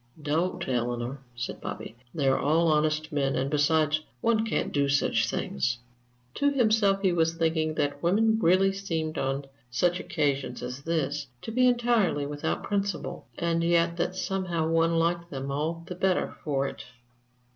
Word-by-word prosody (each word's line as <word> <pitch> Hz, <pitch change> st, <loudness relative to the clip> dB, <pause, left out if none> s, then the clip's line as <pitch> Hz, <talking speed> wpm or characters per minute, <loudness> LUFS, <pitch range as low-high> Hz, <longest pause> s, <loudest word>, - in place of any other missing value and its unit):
"Don't, 165 Hz, +4 st, -1 dB
Eleanor," 120 Hz, +1 st, -2 dB, 0.2 s
said 120 Hz, 0 st, -5 dB
Bobby. 110 Hz, -, -6 dB, 0.2 s
"They're 135 Hz, -4 st, +1 dB
all 160 Hz, +3 st, +3 dB
honest 155 Hz, +1 st, +1 dB
men 140 Hz, -2 st, 0 dB
and 135 Hz, +2 st, -1 dB
besides, 155 Hz, +1 st, +2 dB, 0.2 s
one 225 Hz, -, +2 dB
can't -, -, -1 dB
do 140 Hz, -1 st, +2 dB
such 140 Hz, +1 st, +2 dB
things!" 120 Hz, -, -1 dB, 0.6 s
To 285 Hz, -, +2 dB
himself 215 Hz, -7 st, +3 dB
he 190 Hz, -, +4 dB
was 165 Hz, -1 st, +2 dB
thinking 160 Hz, -1 st, 0 dB
that 145 Hz, -1 st, -1 dB
women 220 Hz, +5 st, +3 dB
really 190 Hz, +1 st, +4 dB
seemed 165 Hz, -5 st, -3 dB
on 135 Hz, +1 st, -1 dB, 0.2 s
such 175 Hz, +9 st, +1 dB
occasions 135 Hz, -5 st, -1 dB
as 125 Hz, +2 st, -5 dB
this 145 Hz, -2 st, -1 dB, 0.2 s
to -, -, -5 dB
be 255 Hz, +2 st, +4 dB
entirely 235 Hz, -11 st, +2 dB
without 145 Hz, 0 st, -3 dB
principle, 200 Hz, -3 st, -2 dB
and 170 Hz, 0 st, 0 dB
yet 170 Hz, 0 st, +2 dB
that 180 Hz, +2 st, -1 dB
somehow 185 Hz, -4 st, -1 dB
one 165 Hz, 0 st, +2 dB
liked 170 Hz, +1 st, 0 dB
them 135 Hz, -2 st, -4 dB
all 160 Hz, +4 st, -2 dB
the 180 Hz, -, -6 dB
better 185 Hz, 0 st, 0 dB
for 140 Hz, -3 st, 0 dB
it. -, -, -7 dB
165 Hz, 155 wpm, -27 LUFS, 145-185 Hz, 0.6 s, he